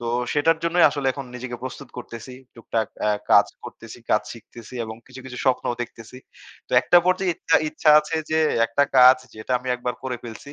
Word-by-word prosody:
তো 120 - -6 0.3
সেটার 160 +2 +2
জন্যই 170 +1 +3
আসলে 140 -2 -4
এখন 140 -1 -7
নিজেকে 125 0 -6
প্রস্তুত 130 0 -8
করতেসি। 125 +1 -9 0.2
টুকটাক 115 -1 -3 0.2
আ - - +2 0.2
কাজ - - +6 0.2
করতেসি, - - -11
কাজ - - +3
শিখতেসি 120 +1 -13
এবং 110 0 -8
কিছু, 130 0 -12
কিছু 125 -1 -8
স্বপ্নও 125 -2 +1
দেখতেসি। 115 +1 -11 0.5
তো - - -11
একটা 175 - +4
পর্যায়ে 185 0 +1
ইচ্ছা, - - +2
ইচ্ছা 150 - +2
আছে 155 +2 -4
যে 160 - +2 0.3
একটা 115 +5 +1 0.2
কাজ 130 +1 +8 0.2
যেটা 110 +4 -5
আমি 125 - -8
একবার 125 0 -4
করে 130 -2 -4
ফেলছি। 120 +5 -10
130 Hz, 190 wpm, -23 LUFS, 120-145 Hz, 0.5 s, কাজ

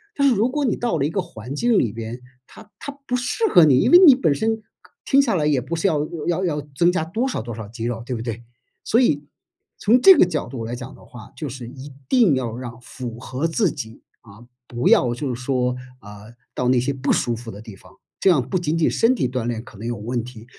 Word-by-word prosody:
但 280 -1 +3
是 250 - +2
如 225 +5 +1
果 295 +1 -1
你 240 - +1
到 240 -1 -1
了 140 - +1
一 - - 0
个 180 - -2
环 135 - -7
境 235 +5 +2
里 115 - 0
边， 115 +3 -7 0.2
它 - - -16
它 285 - -7 0.2
不 250 - 0
适 250 - -1
合 175 - +7
你， 135 -4 +5
因 - - +2
为 350 - +9
你 290 - +10
本 160 - +1
身 220 +5 -1 0.4
听 275 - +3
下 275 -5 +3
来 155 -5 +1
也 145 -3 +2
不 130 +7 -4
是 165 +4 +1
要 150 -4 0 0.2
要 175 +2 0
要 150 -4 -1
增 170 +5 +3
加 180 -3 -1
多 220 +11 -2
少 260 - -3
多 115 0 -7
少 110 -2 -7
肌 115 +2 -7
肉 115 -1 -3
对 125 - -3
不 115 - -5
对？ 115 0 -5 0.4
所 235 - +2
以 145 - +1 0.5
从 230 +4 +4
这 385 +8 +9
个 185 - +5
角 160 -4 -3
度 120 -2 -6
来 115 +2 -4
讲 125 +1 -9
的 - - -17
话， 120 -3 -13
就 150 - -5
是 125 -1 -8
一 135 +3 -10 0.2
定 215 - +4
要 120 -3 -3
让 120 -1 -8
符 120 -2 -8
合 130 +5 -3
自 175 +3 +1
己， 110 -6 -9 0.2
啊， 115 +2 -16 0.2
不 120 0 -2
要 120 -2 +4
就 130 +1 -3
是 120 - -7
说， 125 -1 0 0.3
啊， 105 0 -12 0.3
到 125 - -2
那 125 -1 +4
些 130 +4 -1
不 135 0 -1
舒 120 - +1
服 115 0 -9
的 100 - -9
地 110 -3 -11
方， - - -18 0.3
这 - - +3
样 140 -9 +2
不 185 - -1
仅 165 -1 -1
仅 165 - +2
身 235 +3 +3
体 180 - 0
锻 125 -2 -3
炼 115 -2 -3
可 115 - -15
能 115 - -6
有 120 - -3
问 120 +3 -3
题， 120 -2 -11
130 Hz, 275 characters per minute, -22 LUFS, 120-180 Hz, 0.5 s, 你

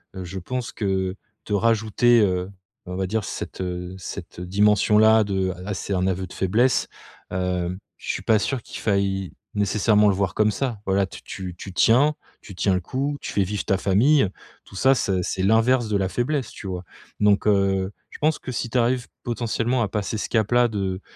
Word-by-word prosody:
heu, 95 - -5
je 95 +2 -6
pense 125 +6 -4
que 95 -2 -1 0.3
te 105 - -3
rajouter, 115 +2 +3
heu, 90 -1 +1 0.4
on 90 - -5
va 95 0 -1
dire, 110 +2 -1
cette, 95 - -6
heu, 90 0 -4
cette 90 - -8
dimension-là 105 +3 +4
de: 95 -2 -1
«Ah, 100 - -2
c'est 100 - -3
un 95 0 +1
aveu 95 0 -1
de 90 - -12
faiblesse», 115 +7 +2 0.4
hem, 90 -1 -1 0.2
je - - -9
suis - - -4
pas 110 -1 +4
sûr 130 +3 -2
qu'il - - -8
faille 100 -2 0 0.2
nécessairement 105 +1 +3
le 100 - +4
voir 95 -1 0
comme 110 0 +2
ça. 115 +1 -2
Voilà, 95 0 +2
tu - - -11
tu 90 -2 -6
tu 95 +1 -9
tiens 135 +10 +4 0.3
tu 100 - -11
tiens 95 0 +2
le 90 - +1
coup, 140 +8 -2
tu - - -6
fais 100 - +2
vivre 105 +2 -3
ta 95 - +2
famille, 110 +8 +4 0.4
tout - - -15
ça, 130 +7 +4
c'est 95 -5 0
c'est 95 - -2
l'inverse 115 +3 +3
de 105 - +2
la 95 -1 0
faiblesse, 120 +3 -1
tu 100 - -9
vois? 90 -1 -4 0.4
Donc 105 0 +3
heu, 95 -1 +2 0.2
je - - -11
pense 155 +1 +2
que 130 - -6
si 120 -1 -3
tu 125 - -1
arrives 125 +1 +1 0.2
potentiellement 120 +1 -1
à 105 - +1
passer 105 +2 -3
ce - - -3
cap-là, 120 +2 +3
de 95 -3 -3
100 Hz, 200 wpm, -23 LUFS, 95-115 Hz, 0.4 s, dimension-là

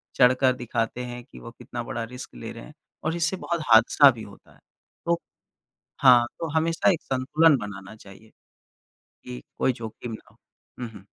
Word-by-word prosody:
चढ़ 125 -1 +6
कर 130 -2 +4
दिखाते 120 0 -3
हैं 120 0 -8
कि 65 - -15
वो - - -10
कितना - - -7
बड़ा 115 0 -4
रिस्क 125 +3 -9
ले - - -7
रहे - - -10
हैं - - -14 0.3
और 155 +2 -1
इससे 170 +2 0
बहुत 170 -2 -3
हादसा 120 +5 +7
भी 115 -2 -9
होता 100 - -15
है - - -24 0.5
तो 170 0 +1 0.8
हाँ, 125 -3 +7
तो 165 - -3
हमेशा 165 +3 +2
एक 170 - -4
संतुलन 145 +4 +3
बनाना 105 0 -8
चाहिए 105 +1 -16 0.9
कि 60 0 -8 0.2
कोई 130 - +2
जोखिम 115 0 -8
ना 110 - -8
हो, - - -26 0.4
हुँ, 120 - -4
हुँ। 100 -3 -14
125 Hz, 180 wpm, -25 LUFS, 110-145 Hz, 0.9 s, हादसा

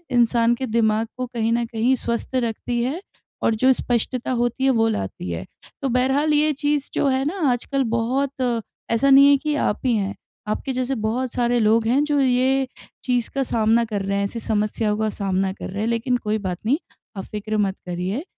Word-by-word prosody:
इंसान 235 0 +3
के 260 - -3
दिमाग 220 -1 +1
को 255 - -2
कहीं 230 -2 -1
न 235 0 +1
कहीं 235 +3 +1
स्वस्थ 235 +2 -3
रखती 240 0 -1
हैं, 285 +9 -2 0.4
और 225 - +3
जो 260 +4 +4
स्पष्टता 245 +1 -2
होती 240 +1 0
है, 270 - +4
वो 225 -3 +3
लाती 95 - -4
है। 85 - -4 0.4
तो 275 - 0
बहरहाल, 265 +5 +2
ये 300 +1 +3
चीज़ 290 0 -1
जो - - +1
है 265 0 +1
ना 360 +7 -2
आजकल 270 +3 -1
बहुत 255 0 0 0.3
ऐसा 230 +4 +3
नहीं 275 +1 +8
है 285 - +6
कि 300 +2 -2
आप - - 0
ही 245 -2 +3
हैं। 200 -1 -1 0.3
आपके 240 +5 -2
जैसे 255 +1 -1
बहुत 235 +3 -2
सारे 240 0 +1
लोग 225 +1 +3
हैं, 270 +5 +3
जो 295 -1 +1
ये 265 +1 +2 0.4
चीज़ 245 -3 0
का 275 - +1
सामना 230 -1 +2
कर 210 -3 -3
रहे 200 +1 -1
हैं, 200 - +1
ऐसी 230 +4 -5
समस्याओं 210 0 -1
का 220 - +1
सामना 195 -2 -1
कर - - -7
रहे 200 +2 -4
हैं। 225 - 0
लेकिन 235 +2 0
कोई 215 -2 -1
बात 185 -3 -3
नहीं, 260 +6 +3 0.4
आप 195 - -4
फ़िक्र 215 +1 -4
मत 195 -2 +1
करिए, 180 - -3
235 Hz, 205 wpm, -22 LUFS, 215-265 Hz, 0.4 s, नहीं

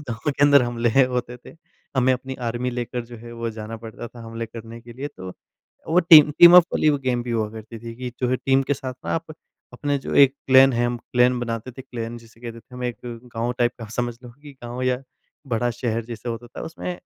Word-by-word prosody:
उस - - -12
गाँव 120 +5 -2
के 140 - -2
अंदर 145 -2 +7
हमले 120 -1 0
है 130 +4 +5
होते 125 -1 -3
थे। 125 - -15 0.4
हमें 130 0 +4
अपनी 130 +1 -4
आर्मी 120 0 -3
लेकर 120 0 -4
जो 120 0 -11
है, 120 +1 -11
वो 115 0 -4
जाना 110 0 -7
पड़ता 115 +1 -9
था 120 - -13
हमले 115 0 -5
करने 115 +1 -10
के 120 0 -12
लिए। 135 +5 -5
तो 95 0 -8 0.6
वो 170 +3 +4
टीम 150 -2 +10
टीमअप 175 0 +10
वाली 155 - +3 0.2
गेम 125 -2 0
भी 120 - -6
हुआ 110 -2 0
करती 110 +1 -9
थी 115 +1 -8
कि 125 0 -5
जो 125 - +1
है 130 - +2
टीम 135 +1 +2
के - - +4
साथ 130 -1 -6
ना - - -1
आप 165 0 -4 0.4
अपने 145 -1 -1
जो 135 - -5
एक 135 0 +5
क्लैन 135 0 +7
है 120 0 +1
हम 120 0 -2 0.2
क्लैन 125 0 +4
बनाते 115 0 -4
थे 130 - -10
क्लैन 120 -2 -6
जिसे 115 0 -19
कहते 115 -1 -8
थे 125 - -18
हम, 125 0 -5
एक 120 -1 -2 0.4
गाँव 115 +2 -1
टाइप 120 0 +2
का 115 - -7
समझ 120 -1 -1
लो 125 - -10
कि 145 -1 -11
गाँव 120 +1 -5
या 130 0 0 0.5
बड़ा 120 +2 +1
शहर 115 -1 -2
जैसा 115 0 -7
होता 115 +1 -6
था, 120 - -10
उसमें 165 +2 -6
120 Hz, 245 wpm, -23 LUFS, 115-130 Hz, 0.6 s, टीम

